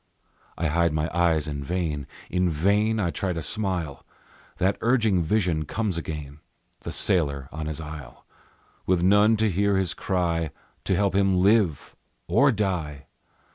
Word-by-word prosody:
I 85 Hz, -, -2 dB
hide 85 Hz, +1 st, +2 dB
my 75 Hz, +1 st, -1 dB
eyes 80 Hz, -3 st, +2 dB
in 70 Hz, -2 st, -4 dB
vain, 75 Hz, -3 st, -2 dB, 0.2 s
In 90 Hz, 0 st, +2 dB
vain 100 Hz, +8 st, +1 dB
I 90 Hz, -5 st, 0 dB
try 95 Hz, +1 st, -2 dB
to 85 Hz, -, -4 dB
smile; 90 Hz, -9 st, -2 dB, 0.5 s
That 95 Hz, +2 st, +1 dB
urging 110 Hz, -6 st, +2 dB
vision 85 Hz, -3 st, 0 dB
comes 105 Hz, +1 st, -2 dB
again, 75 Hz, -3 st, -6 dB, 0.4 s
The -, -, -6 dB
sailor 70 Hz, -7 st, 0 dB
on 80 Hz, 0 st, -5 dB
his 80 Hz, 0 st, -4 dB
isle, 75 Hz, -5 st, -9 dB, 0.6 s
With 90 Hz, -2 st, +2 dB
none 105 Hz, +4 st, +5 dB
to 110 Hz, +1 st, +2 dB
hear 100 Hz, +1 st, +1 dB
his 95 Hz, -2 st, 0 dB
cry, 85 Hz, -4 st, -1 dB, 0.4 s
to -, -, +1 dB
help 100 Hz, -1 st, +1 dB
him 95 Hz, -1 st, +3 dB
live 100 Hz, -, +2 dB, 0.3 s
or 135 Hz, +11 st, +4 dB
die! 85 Hz, -, -2 dB
90 Hz, 150 wpm, -25 LUFS, 80-100 Hz, 0.6 s, none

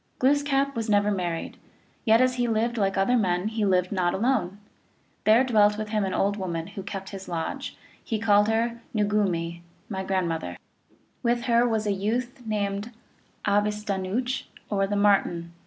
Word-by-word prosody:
Glooskap 280 Hz, 0 st, +2 dB
was 225 Hz, -1 st, -2 dB
never 205 Hz, 0 st, +3 dB
married, 175 Hz, -4 st, -3 dB, 0.5 s
yet 225 Hz, +2 st, +5 dB
as 255 Hz, 0 st, +3 dB
he 245 Hz, -1 st, +1 dB
lived 230 Hz, +1 st, 0 dB
like 195 Hz, -3 st, 0 dB
other 195 Hz, +6 st, +3 dB
men 185 Hz, -3 st, +1 dB
he 220 Hz, -1 st, -2 dB
lived 185 Hz, -2 st, +2 dB
not 180 Hz, -3 st, +1 dB
alone. 210 Hz, -4 st, 0 dB, 0.7 s
There 220 Hz, +4 st, +6 dB
dwelt 210 Hz, -4 st, +4 dB
with 215 Hz, 0 st, -4 dB
him 210 Hz, -2 st, 0 dB
an 190 Hz, -, -2 dB
old 200 Hz, +1 st, +1 dB
woman, 170 Hz, -4 st, -3 dB
who 195 Hz, -, -7 dB
kept 195 Hz, 0 st, -6 dB
his 195 Hz, -1 st, -8 dB
lodge; 165 Hz, -2 st, -4 dB, 0.3 s
he 225 Hz, -, -2 dB
called 210 Hz, -1 st, +4 dB
her 230 Hz, +1 st, 0 dB
Noogumee, 190 Hz, -5 st, 0 dB
" 210 Hz, -, -35 dB
my 190 Hz, -3 st, -3 dB
grandmother." 170 Hz, -, -2 dB
(Micmac.) -, -, -37 dB, 0.2 s
With 240 Hz, 0 st, +1 dB
her 235 Hz, 0 st, +3 dB
was 220 Hz, -2 st, 0 dB
a 205 Hz, -, +1 dB
youth 240 Hz, +6 st, -2 dB
named 205 Hz, 0 st, -2 dB, 0.6 s
Abistanaooch, 210 Hz, +3 st, 0 dB, 0.3 s
or 195 Hz, -1 st, +1 dB
the 205 Hz, -, -1 dB
Martin. 195 Hz, -4 st, +2 dB
205 Hz, 170 wpm, -26 LUFS, 190-230 Hz, 0.7 s, There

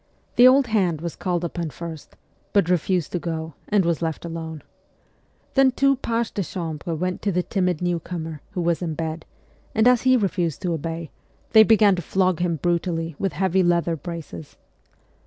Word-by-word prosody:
The 245 Hz, -, +8 dB
old 270 Hz, +1 st, +6 dB
hand 190 Hz, -9 st, +1 dB
was 170 Hz, +1 st, -5 dB
called 175 Hz, -2 st, -2 dB
upon 170 Hz, -1 st, -3 dB
first, 165 Hz, 0 st, -9 dB, 0.4 s
but 190 Hz, -4 st, +3 dB
refused 180 Hz, -1 st, 0 dB
to 175 Hz, -, -1 dB
go, 160 Hz, -1 st, -4 dB, 0.2 s
and 205 Hz, -3 st, +3 dB
was 170 Hz, -1 st, 0 dB
left 165 Hz, 0 st, -3 dB
alone. 160 Hz, -2 st, -6 dB, 0.9 s
Then 270 Hz, -1 st, +5 dB
two 275 Hz, +2 st, +3 dB
pages 230 Hz, -2 st, -1 dB
de 200 Hz, -, -2 dB
chambre 165 Hz, -2 st, -4 dB
went 180 Hz, +3 st, -2 dB
to 205 Hz, -, 0 dB
the 180 Hz, 0 st, 0 dB
timid 180 Hz, -4 st, -1 dB
new 175 Hz, -1 st, 0 dB
comer, 165 Hz, -3 st, -6 dB
who 180 Hz, -, -2 dB
was 170 Hz, 0 st, 0 dB
in 165 Hz, -3 st, -3 dB
bed; 160 Hz, 0 st, -4 dB, 0.5 s
and 220 Hz, +2 st, +4 dB
as 250 Hz, -1 st, +5 dB
he 255 Hz, 0 st, +4 dB
refused 180 Hz, -, -1 dB
to 175 Hz, -2 st, 0 dB
obey, 165 Hz, 0 st, -4 dB, 0.4 s
they 220 Hz, -, +8 dB
began 215 Hz, -2 st, +5 dB
to -, -, -2 dB
flog 185 Hz, 0 st, +1 dB
him 175 Hz, -1 st, 0 dB
brutally 165 Hz, 0 st, -1 dB
with 195 Hz, -5 st, -1 dB
heavy 190 Hz, +3 st, +1 dB
leather 170 Hz, -1 st, +2 dB
braces. 160 Hz, -, -8 dB
175 Hz, 180 wpm, -23 LUFS, 165-195 Hz, 0.9 s, The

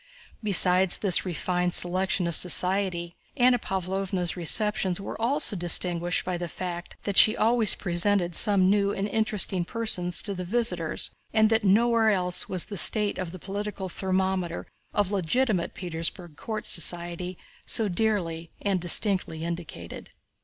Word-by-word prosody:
Besides 185 Hz, -3 st, +5 dB
this 195 Hz, -3 st, +3 dB
refined 180 Hz, 0 st, -1 dB
selection 185 Hz, +1 st, +3 dB
of 170 Hz, -, -2 dB
society 180 Hz, 0 st, +1 dB, 0.2 s
Anna 245 Hz, -1 st, +4 dB
Pávlovna's 190 Hz, -1 st, -3 dB
receptions 190 Hz, +1 st, 0 dB
were 200 Hz, -, -7 dB
also 265 Hz, -1 st, 0 dB
distinguished 175 Hz, 0 st, 0 dB
by 180 Hz, -1 st, -3 dB
the 175 Hz, -, -4 dB
fact 175 Hz, 0 st, -7 dB
that 200 Hz, -2 st, -2 dB
she 215 Hz, -, +7 dB
always 225 Hz, -1 st, +3 dB
presented 175 Hz, 0 st, 0 dB
some 200 Hz, -2 st, +3 dB
new 200 Hz, 0 st, +2 dB
and 200 Hz, 0 st, -3 dB
interesting 210 Hz, -4 st, -1 dB
person 200 Hz, -3 st, -2 dB
to 200 Hz, +3 st, -2 dB
the 180 Hz, -1 st, -5 dB
visitors 180 Hz, -5 st, -1 dB, 0.2 s
and 220 Hz, 0 st, +3 dB
that 225 Hz, -1 st, +2 dB
nowhere 225 Hz, +3 st, +3 dB
else 180 Hz, -3 st, -1 dB
was 185 Hz, -2 st, 0 dB
the 200 Hz, -, -8 dB
state 210 Hz, -3 st, +1 dB
of 180 Hz, -3 st, -4 dB
the 185 Hz, -, -9 dB
political 200 Hz, +1 st, -6 dB
thermometer 185 Hz, -1 st, -2 dB, 0.3 s
of 205 Hz, -2 st, -1 dB
legitimate 200 Hz, +1 st, -1 dB
Petersburg 170 Hz, -1 st, -5 dB
court 215 Hz, +6 st, -6 dB
society 175 Hz, +1 st, -2 dB, 0.3 s
so 220 Hz, -3 st, +1 dB
dearly 175 Hz, -5 st, -2 dB
and 195 Hz, -3 st, -1 dB
distinctly 180 Hz, -2 st, +2 dB
indicated. 165 Hz, -, -7 dB
185 Hz, 140 wpm, -26 LUFS, 175-210 Hz, 0.3 s, she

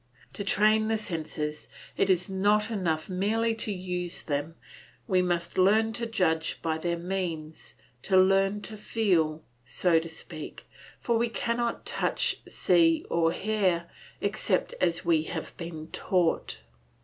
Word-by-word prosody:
To 200 Hz, -, -4 dB
train 215 Hz, +2 st, +3 dB
the 220 Hz, 0 st, +1 dB
senses 155 Hz, -6 st, -4 dB, 0.3 s
it 195 Hz, -, +1 dB
is 180 Hz, -1 st, +2 dB
not 205 Hz, +3 st, +2 dB
enough 165 Hz, -7 st, -1 dB
merely 215 Hz, +5 st, +1 dB
to 220 Hz, -, -1 dB
use 180 Hz, -2 st, -4 dB
them; 145 Hz, +2 st, -3 dB, 0.5 s
we 185 Hz, -1 st, +3 dB
must 175 Hz, 0 st, -1 dB
learn 220 Hz, +4 st, +4 dB
to 235 Hz, +1 st, -1 dB
judge 160 Hz, -7 st, 0 dB
by 160 Hz, -1 st, -1 dB
their 170 Hz, +1 st, -1 dB
means, 170 Hz, -3 st, -4 dB, 0.3 s
to 190 Hz, -, +2 dB
learn 195 Hz, +2 st, +4 dB
to 215 Hz, 0 st, -6 dB
feel, 170 Hz, -8 st, +1 dB, 0.2 s
so 165 Hz, +7 st, +2 dB
to 165 Hz, +1 st, -7 dB
speak; 160 Hz, -1 st, -8 dB, 0.3 s
for 235 Hz, -1 st, +1 dB
we 235 Hz, 0 st, +1 dB
cannot 235 Hz, +2 st, -2 dB
touch, -, -, 0 dB
see, 165 Hz, -2 st, +3 dB
or 165 Hz, -1 st, +3 dB
hear, 185 Hz, -4 st, 0 dB, 0.3 s
except 200 Hz, -2 st, 0 dB
as 170 Hz, 0 st, +1 dB
we 165 Hz, -2 st, +4 dB
have 160 Hz, -1 st, -6 dB
been 165 Hz, -2 st, -6 dB
taught. 180 Hz, -3 st, 0 dB
180 Hz, 140 wpm, -28 LUFS, 165-210 Hz, 0.5 s, learn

